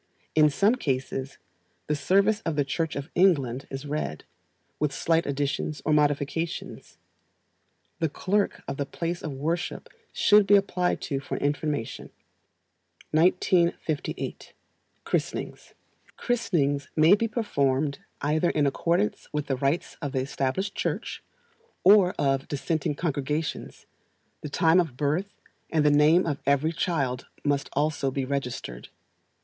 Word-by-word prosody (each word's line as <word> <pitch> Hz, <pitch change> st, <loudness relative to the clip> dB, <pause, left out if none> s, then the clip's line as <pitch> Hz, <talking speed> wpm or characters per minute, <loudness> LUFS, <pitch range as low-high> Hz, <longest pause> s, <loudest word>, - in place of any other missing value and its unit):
In 155 Hz, -1 st, +5 dB
some 200 Hz, -, +3 dB
cases, 135 Hz, -, -3 dB, 0.5 s
the 150 Hz, -, 0 dB
service 200 Hz, +7 st, +2 dB
of 165 Hz, -6 st, -2 dB
the 145 Hz, -1 st, +1 dB
Church 160 Hz, +3 st, -2 dB
of 140 Hz, +3 st, -5 dB
England 140 Hz, -9 st, +2 dB
is 135 Hz, +1 st, -6 dB
read, 145 Hz, -, -3 dB, 0.6 s
with 150 Hz, -2 st, +1 dB
slight 165 Hz, +3 st, +1 dB
additions 145 Hz, +1 st, -2 dB
or 155 Hz, -, +2 dB
modifications. 150 Hz, +2 st, -1 dB, 1.0 s
The 160 Hz, -, +1 dB
clerk 200 Hz, +7 st, -1 dB
of 140 Hz, -, -4 dB
the 140 Hz, -, -1 dB
place 170 Hz, +4 st, -3 dB
of 150 Hz, -, -4 dB
worship 165 Hz, +6 st, -3 dB, 0.2 s
should 210 Hz, -1 st, +5 dB
be 205 Hz, -, +7 dB
applied 185 Hz, -3 st, +1 dB
to 140 Hz, -3 st, -2 dB
for 140 Hz, -, -5 dB
information. 145 Hz, -3 st, -2 dB, 1.0 s
1958. 170 Hz, -1 st, +1 dB, 0.5 s
Christenings. -, -, -3 dB, 0.4 s
Christenings 145 Hz, -, 0 dB
may 160 Hz, +4 st, +6 dB
be 225 Hz, +3 st, +3 dB
performed 140 Hz, -, 0 dB, 0.2 s
either 155 Hz, +4 st, +1 dB
in 150 Hz, -, +1 dB
accordance 170 Hz, +8 st, 0 dB
with 150 Hz, -1 st, -2 dB
the 135 Hz, -, -1 dB
rites 140 Hz, +6 st, -1 dB
of 145 Hz, -3 st, -4 dB
the 130 Hz, -, +1 dB
Established 140 Hz, +9 st, -2 dB
Church, -, -, -3 dB, 0.6 s
or 190 Hz, -1 st, +6 dB
of 135 Hz, -1 st, +1 dB
dissenting 150 Hz, +1 st, -1 dB
congregations; 150 Hz, 0 st, -3 dB, 0.6 s
the 150 Hz, -, -5 dB
time 160 Hz, +4 st, +4 dB
of 160 Hz, -8 st, -1 dB
birth, 155 Hz, +8 st, 0 dB, 0.4 s
and 155 Hz, -2 st, +2 dB
the 150 Hz, -, +6 dB
name 150 Hz, +5 st, +5 dB
of 145 Hz, -4 st, -2 dB
every 140 Hz, +3 st, +3 dB
child, 140 Hz, -8 st, -1 dB, 0.2 s
must 145 Hz, -1 st, 0 dB
also 145 Hz, -2 st, 0 dB
be 135 Hz, 0 st, -2 dB
registered. 125 Hz, -, -4 dB
150 Hz, 130 wpm, -26 LUFS, 140-170 Hz, 1.0 s, be